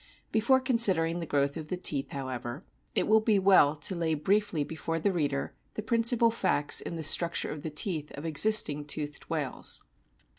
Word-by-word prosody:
Before 235 Hz, +4 st, +2 dB
considering 195 Hz, -, +3 dB
the 165 Hz, -, -6 dB
growth 140 Hz, -1 st, -1 dB
of 155 Hz, -1 st, -8 dB
the 180 Hz, -, -3 dB
teeth, 145 Hz, -6 st, -2 dB
how 135 Hz, -2 st, -6 dB
O -, -, -6 dB
<_> -, -, -3 dB
ever, 120 Hz, +6 st, -7 dB, 0.3 s
it -, -, +1 dB
will 220 Hz, +1 st, +4 dB
be 215 Hz, -1 st, +1 dB
well 185 Hz, -7 st, +4 dB
to 150 Hz, +5 st, -1 dB
lay 165 Hz, -3 st, -1 dB
briefly 190 Hz, 0 st, 0 dB
before 165 Hz, +2 st, -5 dB
the 180 Hz, +5 st, 0 dB
reader 145 Hz, -6 st, -3 dB, 0.2 s
the 215 Hz, -, -5 dB
principal 230 Hz, 0 st, +2 dB
facts 150 Hz, -10 st, +1 dB
in -, -, -7 dB
the 160 Hz, -, -6 dB
structure 170 Hz, +2 st, +1 dB
of 150 Hz, -, -7 dB
the 160 Hz, -, -5 dB
teeth 150 Hz, 0 st, -3 dB
of 145 Hz, -, -8 dB
existing 155 Hz, -3 st, +4 dB
toothed 150 Hz, 0 st, -6 dB
whales. -, -, -1 dB
165 Hz, 195 wpm, -28 LUFS, 145-210 Hz, 0.3 s, will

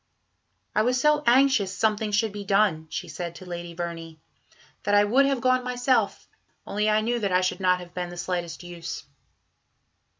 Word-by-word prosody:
"I 215 Hz, -, +3 dB
was 250 Hz, +3 st, +1 dB
so 300 Hz, +2 st, +3 dB
anxious 255 Hz, -5 st, +4 dB
something 215 Hz, -1 st, +1 dB
should 210 Hz, +1 st, +1 dB
be 205 Hz, 0 st, -6 dB
done," 195 Hz, -5 st, +2 dB
she -, -, -5 dB
said 170 Hz, -1 st, -6 dB
to 185 Hz, -, -11 dB
Lady 175 Hz, -1 st, -7 dB
Verney, 165 Hz, -2 st, -6 dB, 0.6 s
"that 205 Hz, +1 st, +1 dB
I 205 Hz, -, +6 dB
would 260 Hz, +7 st, +4 dB
have 275 Hz, -3 st, 0 dB
gone 255 Hz, 0 st, +2 dB
myself, 245 Hz, -3 st, 0 dB, 0.4 s
only 210 Hz, +1 st, 0 dB
I 215 Hz, 0 st, +3 dB
knew 240 Hz, +2 st, 0 dB
that 200 Hz, -3 st, -1 dB
I 180 Hz, 0 st, +3 dB
should 185 Hz, 0 st, -1 dB
not 180 Hz, -1 st, +2 dB
have 175 Hz, -1 st, -11 dB
been 180 Hz, -1 st, -4 dB
the 175 Hz, -, -9 dB
slightest 175 Hz, -1 st, -4 dB
use." 170 Hz, -2 st, -7 dB
205 Hz, 180 wpm, -25 LUFS, 175-235 Hz, 0.6 s, I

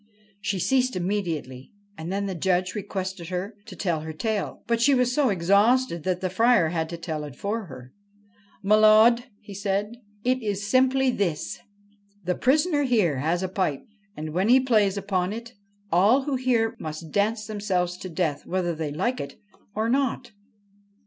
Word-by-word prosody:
She 200 Hz, 0 st, -2 dB
ceased 255 Hz, +5 st, +1 dB
immediately, 175 Hz, -9 st, -3 dB, 0.2 s
and 165 Hz, 0 st, -6 dB
then 200 Hz, +1 st, -1 dB
the 195 Hz, -, -3 dB
Judge 185 Hz, +1 st, 0 dB
requested 190 Hz, -3 st, -5 dB
her 185 Hz, +4 st, -3 dB
to -, -, -9 dB
tell 175 Hz, -5 st, -1 dB
her 160 Hz, +1 st, -6 dB
tale; 215 Hz, +5 st, -3 dB
but 235 Hz, -1 st, 0 dB
she 275 Hz, +3 st, +5 dB
was 250 Hz, -1 st, +2 dB
so 280 Hz, -2 st, +3 dB
exhausted 200 Hz, +3 st, +3 dB
that 185 Hz, -1 st, -1 dB
the 185 Hz, -, -1 dB
Friar 225 Hz, -4 st, +4 dB
had 160 Hz, -1 st, -2 dB
to 170 Hz, -, -5 dB
tell 160 Hz, -3 st, -4 dB
it 145 Hz, -4 st, -8 dB
for 210 Hz, -, -3 dB
her. 130 Hz, -5 st, -12 dB, 0.7 s
1 210 Hz, +2 st, +4 dB
M'lud,' 220 Hz, +3 st, +6 dB, 0.2 s
he 205 Hz, -1 st, -11 dB
said, 200 Hz, +1 st, -1 dB, 0.2 s
' 205 Hz, 0 st, -34 dB
it 255 Hz, +1 st, +2 dB
is 205 Hz, -2 st, -2 dB
simply 260 Hz, +2 st, +3 dB
this: 175 Hz, -9 st, -2 dB, 0.7 s
the 180 Hz, -, +1 dB
prisoner 295 Hz, -, +2 dB
here 215 Hz, -, +2 dB
has 170 Hz, +6 st, 0 dB
a -, -, 0 dB
pipe, 185 Hz, -7 st, -1 dB, 0.3 s
and, 155 Hz, 0 st, -5 dB
when 190 Hz, +5 st, +1 dB
he 255 Hz, +2 st, +7 dB
plays 215 Hz, -6 st, +2 dB
upon 190 Hz, -2 st, -1 dB
it, 230 Hz, +1 st, -8 dB, 0.4 s
all 205 Hz, +11 st, +4 dB
who 285 Hz, 0 st, -2 dB
hear 250 Hz, -3 st, +1 dB
must 155 Hz, 0 st, -7 dB
dance 215 Hz, +2 st, 0 dB
themselves 195 Hz, -4 st, -1 dB
to 185 Hz, -, -7 dB
death, 160 Hz, -4 st, -1 dB
whether 180 Hz, -1 st, -1 dB
they 155 Hz, -2 st, -4 dB
like 240 Hz, -, -1 dB
it 140 Hz, 0 st, -8 dB, 0.4 s
or 220 Hz, +1 st, 0 dB
not.' 255 Hz, -1 st, 0 dB
200 Hz, 175 wpm, -25 LUFS, 175-235 Hz, 0.7 s, he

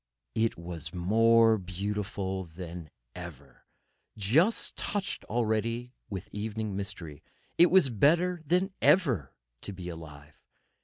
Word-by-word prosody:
It 115 Hz, 0 st, +1 dB
was 85 Hz, -1 st, -6 dB
more 115 Hz, +4 st, +5 dB
beautiful 95 Hz, 0 st, -3 dB
than 85 Hz, -1 st, -8 dB, 0.2 s
ever, 75 Hz, -6 st, -11 dB, 0.5 s
just 145 Hz, -, +2 dB
touched 200 Hz, -1 st, -2 dB
already 115 Hz, +2 st, -1 dB, 0.2 s
with 95 Hz, -3 st, -5 dB
evening 110 Hz, -1 st, -3 dB
mystery—it 95 Hz, -, -1 dB
was 175 Hz, -7 st, +5 dB
better 170 Hz, -, +3 dB
than 180 Hz, +5 st, +1 dB
ever 140 Hz, -, +3 dB, 0.3 s
to -, -, -4 dB
be 90 Hz, -2 st, -7 dB
alive. 75 Hz, -3 st, -11 dB
105 Hz, 105 wpm, -29 LUFS, 90-120 Hz, 0.5 s, more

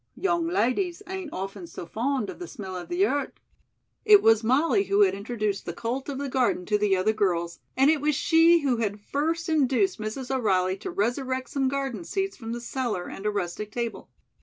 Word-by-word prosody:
"Young 345 Hz, -3 st, 0 dB
ladies 350 Hz, -, 0 dB
ain't 375 Hz, -4 st, -6 dB
often 195 Hz, -1 st, -6 dB
so 170 Hz, -, -8 dB
fond 235 Hz, +4 st, -1 dB
of -, -, -13 dB
the 355 Hz, -, -6 dB
smell 190 Hz, -, -7 dB
of 180 Hz, -, -7 dB
the 360 Hz, +3 st, +2 dB
earth." 285 Hz, -7 st, -1 dB, 0.7 s
It 420 Hz, -2 st, +7 dB
was 225 Hz, 0 st, +5 dB
Molly 305 Hz, -, +3 dB
who 400 Hz, +1 st, +2 dB
had 395 Hz, -, +5 dB
introduced 210 Hz, -1 st, -3 dB
the 170 Hz, -, -3 dB
cult 240 Hz, -, -4 dB
of 275 Hz, -, -4 dB
the 280 Hz, +1 st, -3 dB
garden 250 Hz, -8 st, +1 dB
to 210 Hz, +2 st, +2 dB
the 205 Hz, -2 st, +3 dB
other 195 Hz, +4 st, +2 dB
girls, 170 Hz, -5 st, -1 dB, 0.2 s
and 270 Hz, +3 st, +6 dB
it 310 Hz, -3 st, 0 dB
was 300 Hz, 0 st, +1 dB
she 330 Hz, +3 st, +5 dB
who 265 Hz, -4 st, +1 dB
had 210 Hz, -2 st, -2 dB
first 315 Hz, +9 st, -2 dB
induced 310 Hz, -, +2 dB
Mrs. 245 Hz, +5 st, -3 dB
O'Reilly 185 Hz, -6 st, +1 dB
to -, -, -6 dB
resurrect 260 Hz, +4 st, -1 dB
some 270 Hz, -2 st, +1 dB
garden 265 Hz, -7 st, -2 dB
seats 390 Hz, -, -2 dB
from 225 Hz, -3 st, -7 dB
the 240 Hz, 0 st, -4 dB
cellar 235 Hz, -7 st, -3 dB
and 200 Hz, -, -5 dB
a -, -, +3 dB
rustic 205 Hz, +1 st, -3 dB
table. 235 Hz, 0 st, -4 dB
250 Hz, 205 wpm, -26 LUFS, 210-310 Hz, 0.7 s, It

